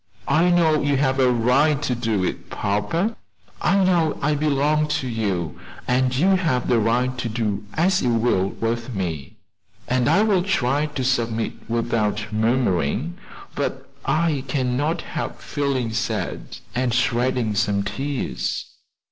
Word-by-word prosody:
"I 160 +5 +3
know 165 -3 +3
you 145 -1 +1
have 135 -1 +1
a 130 -1 +5
right 135 +5 +3
to 130 - 0
do 115 -5 -1
it, - - -3
papa; 105 - -1 0.5
I 195 +1 +3
know 170 -4 +2
I 150 +2 +1
belong 150 +1 +1
to 150 -3 -1
you, 100 -9 -2 0.3
and 130 0 +2
you 180 +8 +3
have 160 -11 +1
a 120 - +4
right 125 +3 +1
to 120 - -2
do 105 -3 -2
as 180 +4 +2
you 125 - +1
will 115 -5 +2
with 115 +2 -3
me, 80 -7 -4 0.5
and 125 -1 +2
I 205 - +4
will 200 -4 +3
try 150 -6 +1
to 145 -3 -4
submit 115 -3 0 0.2
without 110 -2 -1
murmuring, 115 - 0 0.3
but - - -4
I 155 -4 +1
cannot 135 +5 0
help - - -5
feeling 135 -6 -2
sad, 115 +1 -3 0.2
and 125 -1 0
shedding 120 -2 +1
some 100 -1 +1
tears." 135 +6 -3
125 Hz, 145 wpm, -22 LUFS, 115-150 Hz, 0.5 s, a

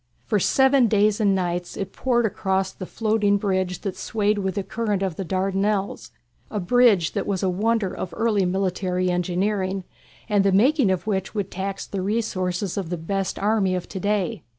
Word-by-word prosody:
For 210 - +1
seven 265 +4 +4
days 210 0 +2
and 200 -2 +3
nights 175 -1 -2
it 195 - -4
poured 240 -2 +1
across 190 -2 0
the 185 - -8
floating 215 -2 +1
bridge 185 -3 -1
that 195 -2 -3
swayed 210 -1 0
with 190 0 -2
the 200 - -1
current 210 -2 -2
of 185 -4 -2
the 195 - -4
Dardanelles, 195 +2 -1 0.4
a 210 - -3
bridge 200 -3 +4
that - - -3
was 195 -2 -1
a 190 - +2
wonder 210 +1 0
of 180 - -5
early 220 -4 +2
military 185 0 0
engineering, 185 +2 -1 0.4
and 205 -3 +3
the 195 - +3
making 250 +4 +4
of 185 +1 -1
which 195 -1 -2
would 200 -2 -2
tax 195 +1 -4
the 195 - -4
resources 190 -3 -1
of 190 -5 -3
the 175 - -2
best 195 +3 -2
army 200 -3 +1
of 180 - -4
to 190 - -5
day. 205 0 -1
195 Hz, 185 wpm, -23 LUFS, 185-210 Hz, 0.4 s, seven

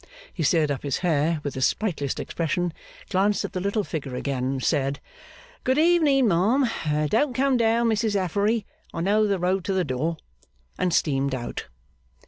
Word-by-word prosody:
He 175 - -5
stirred 155 -1 +2
up 140 - -3
his 140 -2 -1
hair 160 0 +2
with 145 - -3
his 130 - +2
sprightliest 160 -11 -2
expression, 170 +1 -2 0.4
glanced 200 +2 +2
at - - -7
the 185 - -2
little 200 +3 0
figure 140 -8 -5
again, 130 0 -2
said 140 0 0 0.6
'Good 260 +2 +1
evening, 305 -6 +4
ma 190 +7 +3
'am; 155 - 0
don't 250 - +1
come 270 +1 +2
down, 230 0 +2
Mrs 220 -1 +1
Affery, 200 +4 0 0.3
I 165 - -2
know 210 +4 +3
the 200 -1 +1
road 185 +1 0
to 195 - 0
the 185 -1 +1
door,' 150 +5 -2 0.6
and 180 - +1
steamed 140 -4 +1
out. 120 -2 -5
180 Hz, 170 wpm, -25 LUFS, 145-220 Hz, 0.6 s, evening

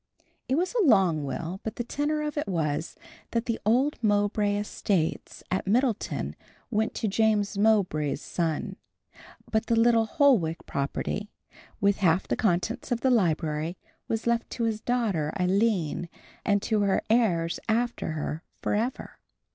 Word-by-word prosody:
It 260 - +3
was 360 - 0
a 480 - +2
long 190 - +4
will, 165 +7 -4
but 220 0 -5
the 240 - -2
tenour 295 +5 -1
of 300 0 -3
it 290 - -2
was, 160 -4 -1 0.3
that 230 0 -1
the 230 -2 -1
old 260 +7 +2
Mowbray 205 -1 +2
estates 200 -4 -2
at 190 +1 -1
Middleton 235 +1 0 0.4
went 220 0 0
to 225 - -1
James 210 0 +2
Mowbray's 195 -10 +2
son, 165 -2 -2 0.7
but 220 0 +1
the 230 - +2
little 230 -1 +4
Holwick 220 - +2
property, 145 +9 -3 0.5
with 200 0 +3
half 185 -1 +2
the - - 0
contents 215 +4 0
of 235 -1 0
the 260 - +3
library, 160 -5 +1 0.3
was 225 0 -2
left 235 0 +1
to 235 - -2
his 220 -2 -1
daughter, 210 -12 0
Aline, 185 -3 +1 0.3
and 205 -1 +1
to 215 -2 +1
her 200 -1 +2
heirs 175 -8 +2
after 235 -7 0
her 155 0 -3
forever. 230 +5 -2
210 Hz, 145 wpm, -27 LUFS, 175-235 Hz, 0.7 s, long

